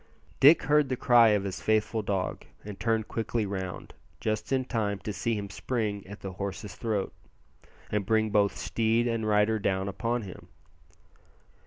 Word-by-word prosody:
Dick 150 +4 +7
heard 145 -1 +3
the 130 - 0
cry 120 -1 +5
of 105 -2 +3
his 95 -2 -5
faithful 110 +1 +1
dog, 100 -3 -2 0.2
and 105 -2 -8
turned 110 -2 0
quickly 115 -1 -2
round, 95 -2 -5 0.3
just 110 +1 -2
in 130 -1 +1
time 105 -5 -1
to 105 +2 -5
see 110 +5 -1
him 100 -1 -4
spring 100 -1 -3
at 100 +1 -10
the 95 - -5
horse's 100 0 -5
throat, 105 -3 -2 0.8
and 105 -1 0
bring 110 +2 +1
both 100 -1 +2
steed 115 +1 +1
and 115 -2 -1
rider 105 +1 +3
down 95 -1 0
upon 115 +4 -2
him. 95 -3 -10
105 Hz, 165 wpm, -28 LUFS, 100-115 Hz, 0.8 s, Dick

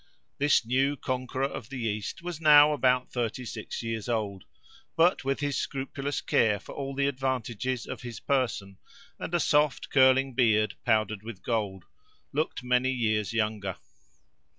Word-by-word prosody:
This 145 -4 +3
new 135 +4 +1
conqueror 130 +1 -2
of 130 -4 -6
the 135 - -6
East 105 - -3
was 175 -2 -5
now 150 -1 +7
about 125 -3 +1
thirty 120 +1 -3
six 110 0 -6
years 115 0 -4
old, 105 -5 -2 0.5
but 170 +1 +3
with 135 +1 -1
his 145 -1 -1
scrupulous 135 +1 -3
care 105 -3 +2
for - - -11
all 135 -1 -5
the 140 0 +1
advantages 130 -2 -2
of - - -7
his 120 -4 -7
person, 110 -8 -1 0.4
and - - -5
a - - +3
soft 150 -2 +2
curling 130 0 +4
beard 110 -3 +3
powdered 110 -2 +2
with 110 -4 -9
gold, 100 -6 -2 0.5
looked 150 -3 -2
many 125 +1 +2
years 110 -5 0
younger. 105 -4 -1
125 Hz, 150 wpm, -28 LUFS, 110-135 Hz, 0.5 s, now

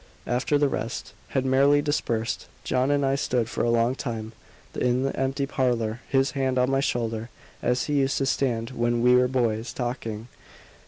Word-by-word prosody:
After 125 +4 +1
the 145 0 +3
rest 115 -4 -4
had 135 -1 -1
merrily 140 +2 +4
dispersed, 120 -6 -1 0.2
John 130 +2 +1
and 145 -1 +2
I 135 - +2
stood 125 -4 0
for - - -2
a 120 - +2
long 115 +1 +3
time 115 -4 -5 0.4
in 125 +1 +1
the 135 - -1
empty 135 +1 0
parlour, 120 -4 0
his 135 0 +2
hand 135 -2 0
on 125 +1 +2
my 135 - +2
shoulder, 115 -4 -1 0.3
as 125 +1 +1
he 145 -1 +1
used 135 0 +1
to 135 - +1
stand 120 -4 0
when 120 -1 0
we 125 0 +6
were 125 0 +5
boys, 120 -3 0
talking. 120 -3 -4
125 Hz, 180 wpm, -25 LUFS, 115-135 Hz, 0.4 s, we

